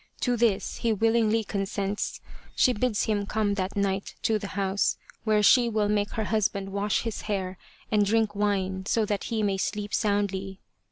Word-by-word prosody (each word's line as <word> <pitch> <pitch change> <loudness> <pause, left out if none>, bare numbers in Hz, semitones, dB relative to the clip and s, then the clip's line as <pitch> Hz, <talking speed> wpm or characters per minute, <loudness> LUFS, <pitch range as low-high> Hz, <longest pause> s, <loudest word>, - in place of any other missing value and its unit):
To 245 -1 +2
this 225 -4 +1
he 230 - 0
willingly 225 +1 +2
con 195 -1 -2
sents. 200 +1 -3 0.3
She 250 - +4
bids 240 -1 0
him 205 -2 -1
come 210 -1 0
that 190 -1 -3
night 195 -1 -1
to 220 -1 +2
the 205 - -5
house, 195 0 +1 0.3
where 215 -1 +3
she 240 +3 +6
will 215 -2 +1
make 205 -1 0
her 220 - -1
husband 200 -2 -1
wash 200 +1 0
his 230 -2 -4
hair 190 -2 -2 0.3
and 210 -1 +4
drink 215 +1 +2
wine 190 -2 -1
so 225 -1 +2
that 205 -1 -2
he 225 -2 -1
may 200 -2 +1
sleep 205 +1 -3
soundly. 195 -2 0
205 Hz, 180 wpm, -27 LUFS, 195-220 Hz, 0.3 s, she